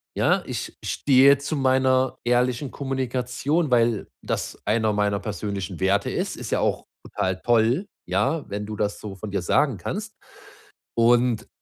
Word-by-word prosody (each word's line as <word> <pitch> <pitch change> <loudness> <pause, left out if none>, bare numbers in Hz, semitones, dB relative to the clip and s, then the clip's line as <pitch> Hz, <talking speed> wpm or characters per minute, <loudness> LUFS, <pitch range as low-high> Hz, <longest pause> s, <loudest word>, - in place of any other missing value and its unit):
ja, - - +2
ich - - -5
stehe 140 0 +5
zu 145 +3 -3
meiner 130 -1 +2
ehrlichen 125 +2 +1
Kommunikation, 135 +3 -1
weil 115 -3 +2 0.2
das - - -3
einer 110 0 +1
meiner 105 -1 +1
persönlichen 100 -3 -5
Werte 100 +2 +2
ist.“ - - -3
Ist - - -6
ja - - +1
auch - - 0 0.2
total 95 0 -2
toll, 120 - +2 0.2
ja, 130 - 0
wenn 105 +1 -4
du 105 0 -6
das 105 0 -1
so 100 -2 -7
von 105 +3 -7
dir 100 -1 -2
sagen 130 +8 +2
kannst 210 - -5 0.8
und 120 0 +3
120 Hz, 150 wpm, -24 LUFS, 105-130 Hz, 0.8 s, stehe